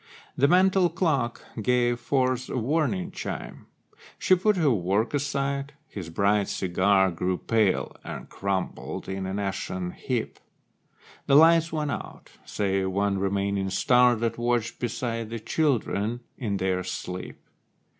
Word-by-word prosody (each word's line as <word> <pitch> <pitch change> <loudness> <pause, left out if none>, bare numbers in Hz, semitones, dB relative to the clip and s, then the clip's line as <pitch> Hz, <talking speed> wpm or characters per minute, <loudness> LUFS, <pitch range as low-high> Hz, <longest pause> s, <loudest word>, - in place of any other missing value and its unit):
The 140 - +4
mantel 185 +2 +4
clock 155 -9 -1 0.2
gave 120 +1 +2
forth 130 0 0
a - - -2
warning 125 - 0
chime. - - -6 0.5
She - - +3
put 190 +3 +3
her 155 -5 +3
work 100 +3 0
aside; 140 0 -1
his 90 - -7
bright 100 +3 +2
cigar 95 +1 +2
Grew 90 +2 -1
pale, 110 -3 +1
and - - -7
crumbled 95 -1 -3
in 95 0 -3
an 95 +1 -3
ashen 95 -2 -3
heap. 120 +2 -3 0.9
The 140 - +5
lights 165 +2 +6
went 150 -2 -1
out, - - -7
save 95 -2 -1
one 100 +1 0
remaining 100 0 0
star 125 +5 +4
That 115 +1 -2
watched 120 -1 0
beside 115 -1 -3
the 115 - -4
children 120 -4 0
in 105 -5 -2
their 95 -1 0
sleep. 90 0 -6
115 Hz, 135 wpm, -26 LUFS, 95-140 Hz, 0.9 s, lights